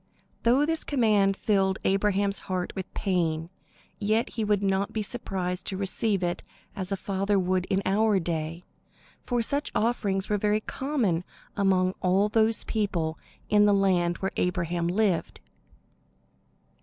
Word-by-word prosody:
Though 255 +5 +4
this 325 +1 -1
command 210 -7 +2
filled 195 -2 +1
Abraham's 200 0 +1
heart 185 -1 -2
with 190 -1 -5
pain, 170 -4 -1 0.5
yet 215 +2 +1
he 225 - -3
would 205 -1 +1
not 195 0 +1
be 220 - -1
as - - -3
surprised 185 -5 -3
to 190 - -2
receive 195 0 0
it 175 0 -1 0.3
as 190 0 -4
a - - +2
father 200 +1 0
would 185 -1 +1
in 195 +1 0
our 210 +2 +3
day; 165 -1 -3 0.6
for 240 -2 +1
such 285 +5 -1
offerings 210 -4 0
were 210 -1 0
very 210 +1 +1
common 230 - -1 0.3
among 185 -2 +2
all 190 +3 +3
those 220 +1 +2
people 175 -8 -1 0.3
in 210 -1 +5
the 205 - +4
land 180 -3 +2
where 190 - -2
Abraham 175 -1 0
lived. 190 -1 0
195 Hz, 145 wpm, -27 LUFS, 185-210 Hz, 0.6 s, in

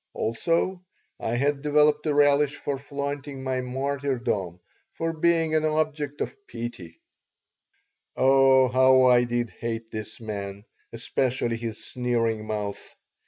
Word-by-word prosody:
Also, 170 +10 0 0.4
I 115 - -2
had 140 +3 0
developed 150 +1 +3
a 150 - +2
relish 145 0 +4
for 140 -2 -4
flaunting 140 -1 -5
my 130 -1 -1
martyrdom, 125 -8 -2 0.3
for 165 0 -3
being 165 0 +2
an 155 0 +2
object 155 -2 -1
of - - -3
pity 115 -9 -7 1.2
Oh, 135 0 +5
how 130 +1 +5
I 125 -1 +5
did 120 -1 -2
hate 115 -1 -5
this 110 0 -7
man, 100 -2 -6 0.3
especially 120 0 -1
his 115 -1 -6
sneering 115 -3 -1
mouth! 105 -2 -3
130 Hz, 120 wpm, -26 LUFS, 115-145 Hz, 1.2 s, Oh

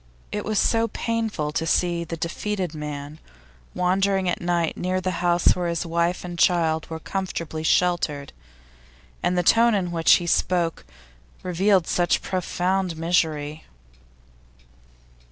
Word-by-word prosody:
It - - -3
was 215 0 -1
so 225 +2 +2
painful 225 -9 -2
to 160 +2 -2
see 170 +1 +1
the 165 0 -6
defeated 180 +1 -3
man 150 0 -6 0.6
wandering 190 +1 +1
at 175 - -1
night 175 -2 0
near 185 +1 -1
the 185 -1 -3
house 175 -1 +3
where 180 -1 -2
his 170 0 -2
wife 170 +2 -1
and 175 -1 -6
child 160 -3 +2
were 160 - -4
comfortably 165 -3 -4
sheltered; 160 -4 +1 0.9
and 180 - 0
the 180 - +2
tone 230 +4 +5
in 180 -3 -1
which 165 -1 +4
he 175 - +3
spoke 170 - 0 0.6
revealed 185 0 +2
such 175 -1 +1
profound 185 -1 -1
misery. 160 -3 -1
175 Hz, 135 wpm, -24 LUFS, 165-185 Hz, 0.9 s, tone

